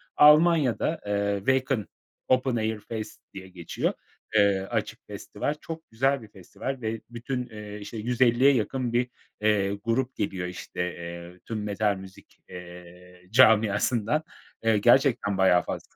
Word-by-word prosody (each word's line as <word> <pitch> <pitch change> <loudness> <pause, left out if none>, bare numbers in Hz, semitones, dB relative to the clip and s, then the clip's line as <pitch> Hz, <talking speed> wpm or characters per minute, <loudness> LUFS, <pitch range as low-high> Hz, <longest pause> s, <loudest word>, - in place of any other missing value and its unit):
Almanya'da, 150 -1 +5
eee, 100 0 0
Wacken 130 +1 0 0.4
Open 130 -1 +2
Airface 110 0 -3 0.2
diye 95 -1 -9
geçiyor, 85 -3 -3 0.4
eee, 100 -2 +4
açık - - -2
festival. 145 - -4
Çok 165 0 -8
güzel 135 +3 +1
bir 110 - -12
festival 105 +7 -6
ve 110 0 -3
bütün, 125 +1 -4
eee, 105 -1 -8
işte 105 +2 -8
150'ye 125 +4 +3
yakın 125 +1 -1
bir, 125 +1 +1 0.3
eee, 105 -2 +2
grup 115 +5 -1
geliyor 95 -3 -2
işte, 90 0 -9 0.2
eee, 85 +1 -9
tüm 110 -2 -4
metal 105 0 0
müzik, 95 0 -13
eee, 90 0 -12
camiasından. 110 +3 +4 0.4
Eee, 110 -1 +3
gerçekten 120 -3 +3
bayağı 90 -2 +4
faz - - -4
110 Hz, 130 wpm, -26 LUFS, 100-125 Hz, 0.4 s, Almanya'da